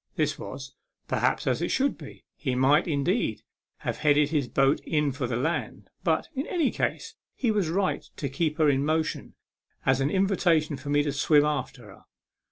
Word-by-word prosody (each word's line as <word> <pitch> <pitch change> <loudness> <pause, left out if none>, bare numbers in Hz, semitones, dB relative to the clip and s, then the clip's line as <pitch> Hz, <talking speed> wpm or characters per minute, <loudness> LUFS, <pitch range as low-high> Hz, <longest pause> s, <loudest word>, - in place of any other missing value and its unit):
This - - 0
was, - - -8 0.3
perhaps, - - 0
as - - 0
it - - -1
should 275 +1 +1
be. 150 -4 -12
He 130 -4 -2
might, 140 +6 +3
indeed, 155 - 0 0.4
have - - -3
headed 150 -1 +3
his 145 -5 0
boat 135 +3 +2
in 150 -2 0
for 130 -1 -3
the 120 - -2
land; 150 +8 -3
but, - - +1
in 275 +2 -3
any 330 -8 +1
case, - - -2 0.2
he 240 -4 +1
was 205 -6 0
right 190 +3 0 0.2
to 140 - -2
keep 150 +3 -1
her 155 -2 +4
in 140 -1 +2
motion 155 +1 -1 0.5
as 135 0 +3
an 135 - +1
invitation 175 -5 +2
to 140 +2 -8
me 145 0 +3
to 145 - -1
swim 145 +1 +4
after 145 -4 -3
her. 100 -2 -15
150 Hz, 185 wpm, -27 LUFS, 140-170 Hz, 0.5 s, her